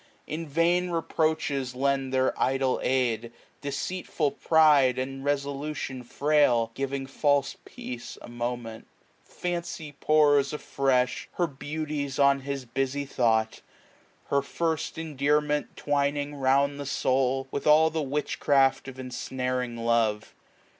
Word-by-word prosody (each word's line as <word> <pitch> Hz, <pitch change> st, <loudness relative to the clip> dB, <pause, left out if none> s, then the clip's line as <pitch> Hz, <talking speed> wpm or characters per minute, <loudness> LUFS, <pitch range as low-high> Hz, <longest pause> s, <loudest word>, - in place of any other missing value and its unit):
In 160 Hz, +1 st, -5 dB
vain 170 Hz, +4 st, +2 dB
reproaches 155 Hz, -6 st, -1 dB
lend 135 Hz, 0 st, 0 dB
their 130 Hz, 0 st, +2 dB
idle 135 Hz, -1 st, +1 dB
aid^ 120 Hz, -3 st, 0 dB, 0.3 s
Deceitful 150 Hz, +1 st, -2 dB
pride, 145 Hz, -4 st, +4 dB
and 135 Hz, +1 st, -4 dB
resolution 140 Hz, -1 st, -2 dB
frail, 125 Hz, -3 st, +2 dB
1095 -, -, -36 dB
Giving 135 Hz, 0 st, -3 dB
false 140 Hz, 0 st, +1 dB
peace 120 Hz, -1 st, -8 dB
a -, -, -11 dB
moment. 120 Hz, -1 st, -5 dB, 0.4 s
Fancy 170 Hz, -3 st, -5 dB
pours. 145 Hz, -1 st, +3 dB
Afresh, 135 Hz, -3 st, 0 dB
her 175 Hz, -, +1 dB
beauties 145 Hz, -1 st, -4 dB
on 140 Hz, 0 st, +4 dB
his 135 Hz, -1 st, -5 dB
busy 135 Hz, +3 st, -2 dB
thought. 110 Hz, -4 st, +1 dB, 0.7 s
Her 140 Hz, -, +3 dB
first 160 Hz, +2 st, -2 dB
endearments 150 Hz, -1 st, 0 dB
twining 145 Hz, 0 st, -1 dB
lound 140 Hz, +2 st, +2 dB
the 140 Hz, -, -5 dB
soul. 135 Hz, 0 st, +1 dB
With 140 Hz, -, -3 dB
all 155 Hz, +1 st, +6 dB
the 160 Hz, 0 st, -1 dB
witchcraft 140 Hz, -1 st, +1 dB
of 135 Hz, -1 st, -8 dB
ensnaring 125 Hz, -1 st, -3 dB
love. 115 Hz, -2 st, 0 dB
140 Hz, 120 wpm, -27 LUFS, 130-150 Hz, 0.7 s, all